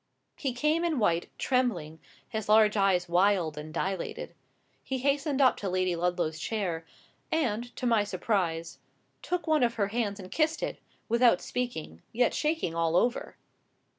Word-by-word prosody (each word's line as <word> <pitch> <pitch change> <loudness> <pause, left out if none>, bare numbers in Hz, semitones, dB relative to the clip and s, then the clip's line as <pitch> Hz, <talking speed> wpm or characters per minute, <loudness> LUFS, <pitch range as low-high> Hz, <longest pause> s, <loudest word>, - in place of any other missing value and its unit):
He 270 - -2
came 300 +6 +1
in 335 -4 0
white, 175 -7 +1
trembling, 190 - 0 0.3
his 220 -2 -4
large 215 0 +6
eyes 190 -3 +2
wild 175 -2 +2
and 150 +1 -7
dilated. 190 +2 -3 0.5
He 265 - -2
hastened 280 +1 0
up 260 - +5
to 200 - -3
Lady 185 -1 +1
Ludlow's 170 -2 -1
chair, 170 -4 -3 0.4
and, 240 -8 0
to - - -4
my 230 -4 +3
surprise, 180 -4 -2 0.4
took 360 0 -2
one 315 -2 +3
of 235 -1 +2
her 200 -3 0
hands 210 -2 -2
and 185 -1 -10
kissed 315 0 +1
it, - - -3 0.3
without 235 -4 +4
speaking, 230 - -4
yet 245 +1 +2
shaking 305 - 0
all 165 0 0
over. 240 +7 0
210 Hz, 155 wpm, -29 LUFS, 175-250 Hz, 0.5 s, large